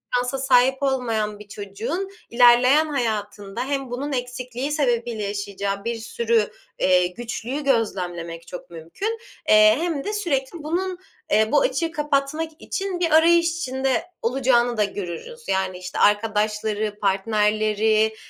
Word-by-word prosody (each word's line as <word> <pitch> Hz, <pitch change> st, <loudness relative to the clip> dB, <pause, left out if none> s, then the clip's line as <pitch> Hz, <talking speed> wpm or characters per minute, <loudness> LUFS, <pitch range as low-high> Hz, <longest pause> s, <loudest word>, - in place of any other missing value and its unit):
şansa 250 Hz, +2 st, 0 dB
sahip 265 Hz, +1 st, +3 dB
olmayan 225 Hz, -6 st, -1 dB
bir 210 Hz, -, -12 dB
çocuğun 215 Hz, -, -4 dB, 0.2 s
ilerleyen 245 Hz, +5 st, +6 dB
hayatında 210 Hz, -5 st, -3 dB
hem 275 Hz, -3 st, -3 dB
bunun 280 Hz, +4 st, -3 dB
eksikliği 250 Hz, +2 st, -4 dB
sebebiyle 240 Hz, -6 st, 0 dB
yaşayacağı 200 Hz, 0 st, -3 dB
bir 235 Hz, 0 st, -1 dB
sürü, 230 Hz, -1 st, 0 dB, 0.3 s
eee, 180 Hz, -1 st, +4 dB
güçlüğü 240 Hz, +7 st, -5 dB
gözlemlemek 175 Hz, -9 st, -1 dB
çok 180 Hz, 0 st, -9 dB
mümkün, 175 Hz, -, -5 dB, 0.3 s
eee, 215 Hz, 0 st, +7 dB
hem 330 Hz, -5 st, -2 dB
de 420 Hz, -, -3 dB
sürekli 320 Hz, -5 st, -2 dB
bunun, 360 Hz, +4 st, -2 dB, 0.3 s
eee, 215 Hz, +1 st, +4 dB
bu 290 Hz, -, +4 dB
açığı 325 Hz, +5 st, 0 dB
kapatmak 295 Hz, +1 st, -1 dB
için 385 Hz, -2 st, -3 dB
bir 335 Hz, -2 st, +1 dB
arayış 335 Hz, +2 st, +5 dB
içinde 265 Hz, -4 st, -1 dB, 0.2 s
olacağını 245 Hz, -1 st, +2 dB
da 210 Hz, -, +3 dB
görürüz. 200 Hz, -, -6 dB
Yani 190 Hz, -1 st, 0 dB
işte 180 Hz, 0 st, -6 dB
arkadaşları, 210 Hz, 0 st, +1 dB
partnerleri, 215 Hz, +2 st, +2 dB
235 Hz, 130 wpm, -23 LUFS, 210-280 Hz, 0.3 s, eee